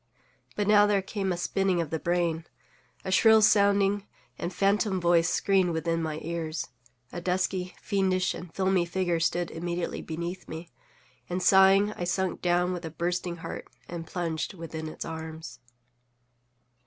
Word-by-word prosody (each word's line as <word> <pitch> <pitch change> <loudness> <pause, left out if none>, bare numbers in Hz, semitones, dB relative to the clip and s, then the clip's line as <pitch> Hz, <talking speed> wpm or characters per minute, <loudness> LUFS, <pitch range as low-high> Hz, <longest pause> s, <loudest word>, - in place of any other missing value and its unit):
But 205 - 0
now 210 0 +6
there 200 -2 +2
came 195 -1 -2
a 175 - -1
spinning 185 +1 0
of 165 -3 -2
the 160 - -1
brain; 170 -1 0 0.6
a 190 - -2
shrill 220 +3 +6
sounding 200 0 +3 0.3
and 170 - -4
phantom 195 +1 +1
voice 170 -1 +3
screamed 190 -3 +2
within 165 +1 -1
my 155 -1 -3
ears; 165 -1 -4 0.4
a 175 - -5
dusky, 180 0 -1
fiendish, 190 -2 +1
and 175 -2 -9
filmy 190 0 +1
figure 175 -1 -1
stood 170 +1 0
immediately 170 +1 -3
beneath 170 +3 -5
me; 160 +2 -8 0.6
and, 180 +1 -2
sighing, 195 +2 +5
I 175 - -4
sunk 185 0 -1
down 180 +1 +2
with 175 -1 -5
a 165 - -4
bursting 175 +2 -2
heart, - - -6 0.2
and 170 -1 -6
plunged 170 +1 -3
within 160 -2 -6
its 155 - -6
arms. 160 0 -7
175 Hz, 155 wpm, -28 LUFS, 165-190 Hz, 0.6 s, now